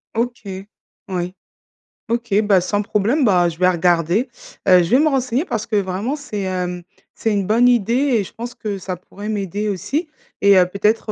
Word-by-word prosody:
OK. 235 -1 -2 0.6
Oui. 180 -1 -3 0.7
OK, 235 -3 0
bah 200 -3 +4
sans 205 +3 -1
problème. 220 +7 +1
Bah 180 -5 +4
je 165 - -9
vais 185 +1 +4
regarder. 175 - +1 0.4
Heu 180 -1 +7
je 170 - -3
vais 255 - +6
me 310 - +4
renseigner, 260 -1 0
parce 230 - -3
que 215 - -3
vraiment 200 +7 -1
c'est, 280 -9 -6
hem, 180 -1 -3 0.3
c'est 225 - -1
une 200 -2 0
bonne 235 +3 +4
idée 235 -3 +2 0.3
et - - 0
je - - -11
pense 240 +1 -6
que 215 -4 -4
ça 185 -1 -5
pourrait 200 +4 -9
m'aider 205 0 -2
aussi. 280 - -2 0.3
Et 200 0 +6
heu, 180 -1 +5
peut-être 210 +3 0
205 Hz, 190 wpm, -20 LUFS, 185-235 Hz, 0.7 s, Heu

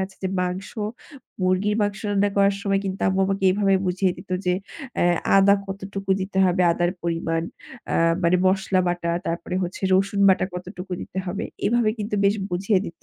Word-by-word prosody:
যাচ্ছে 190 0 -4
যে - - +1
মাংস 180 +2 -3 0.7
মুরগির 185 +3 +1
মাংস 205 -1 -1
রান্না 205 0 +2
করার 200 0 +3
সময় 195 -1 +1
কিন্তু 190 0 -4
আম্মু 190 0 +1
আমাকে 195 0 -1
এভাবে 195 0 +2
বুঝিয়ে 185 0 +1
দিত - - -13 0.2
যে 180 - +3 0.4
অ্যা 175 0 +3 0.2
আদা 195 +1 +6
কতটুকু 195 0 -6
দিতে 190 0 -3
হবে, 180 0 +2
আদার 175 +1 0
পরিমাণ, 165 -1 -1 0.5
অ্যা - - +1 0.2
মানে 170 +2 +4
মসলা 190 0 +2
বাটা 175 -1 -1 0.2
তারপরে 170 +2 -3
হচ্ছে 180 +2 -5
রসুন 195 +1 +1
বাটা 190 -1 +4
কতটুকু 180 +1 -7
দিতে 190 - -7
হবে? 185 +3 -3 0.2
এভাবে 235 -1 +2
কিন্তু 210 +1 -3
বেশ 200 +1 +4 0.2
বুঝিয়ে 195 +3 +1
দিত। 165 - -11
190 Hz, 175 wpm, -23 LUFS, 180-195 Hz, 0.7 s, আদা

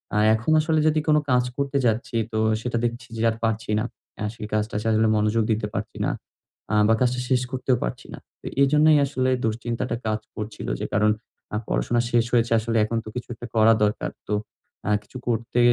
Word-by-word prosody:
আ - - +2 0.2
এখন 115 +8 -1
আসলে 155 0 +1
যদি 155 0 +3
কোন 150 0 +5
কাজ 125 0 +4
করতে 140 0 0
যাচ্ছি, 115 +3 0 0.2
তো 110 - -1 0.2
সেটা 120 0 -2
দেখছি 120 -1 -3
যে, - - -2
আর 110 - -2
পারছি 110 -1 -1
না। 110 - 0 0.4
আ - - -1
সেই 105 - -6
কাজটাতে 105 0 -1
আসলে 110 0 +3
মনোযোগ 105 +1 +2
দিতে 105 -1 0
পারছি 100 - -4
না। - - +1 0.6
আ - - +3
বা 115 - +5
কাজটা 125 0 +2
শেষ 130 -2 +3
করতেও 130 -1 +1
পারছি - - -5
না। - - -8 0.4
এজন্যই 150 +2 +5
আসলে 130 -2 0 0.2
দুশ্চিন্তাটা 115 +3 -2
কাজ 110 0 0 0.2
করছিল, 105 0 -6
যে, - - -2
কারণ 105 +1 +4 0.4
আ - - +1
পড়াশোনা 120 0 +1
শেষ 120 -1 +3
হয়েছে, 115 -1 +3
আসলে 115 +1 -1
এখন 115 +2 -2
তো - - -6
কিছু 125 - -5
একটা 120 - -8
করা 110 +1 +6
দরকার। 105 0 0 0.2
তো 105 - -1 0.5
আ - - +1
কিছু 130 - -11
করতে 120 +1 0
115 Hz, 200 wpm, -24 LUFS, 110-125 Hz, 0.6 s, করা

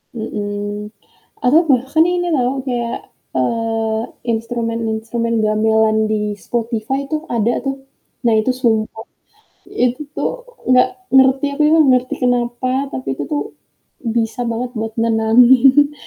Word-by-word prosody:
mhm, 205 -2 -4 0.5
atau 265 +6 +5
bahkan 270 +3 +3
ini 355 0 0
loh 265 -3 0
kayak, 240 -2 -3 0.2
eee, 225 - 0 0.4
instrumen-instrumen 230 0 -2
gamelan 220 0 +2
di 210 -1 -2
Spotify 235 +5 -3
itu 310 +1 -3
ada 235 -4 0
tuh, 270 0 -1 0.5
nah 235 - +3
itu 215 +4 +1
sumpeh, 220 -3 -1 0.7
itu 250 +3 0 0.2
tuh - - -3 0.3
gak 255 0 +5 0.3
ngerti, 265 +1 +5
aku - - -9
ini 300 - +4
nggak 300 - +5
ngerti 250 0 -2
kenapa, 245 +1 -1 0.2
tapi 260 - -5
itu - - -3
tuh 295 - 0 0.7
bisa 225 +1 -1
banget 240 +2 -3
buat 220 0 -3
nenangin 245 +5 +5
235 Hz, 125 wpm, -18 LUFS, 220-260 Hz, 0.7 s, atau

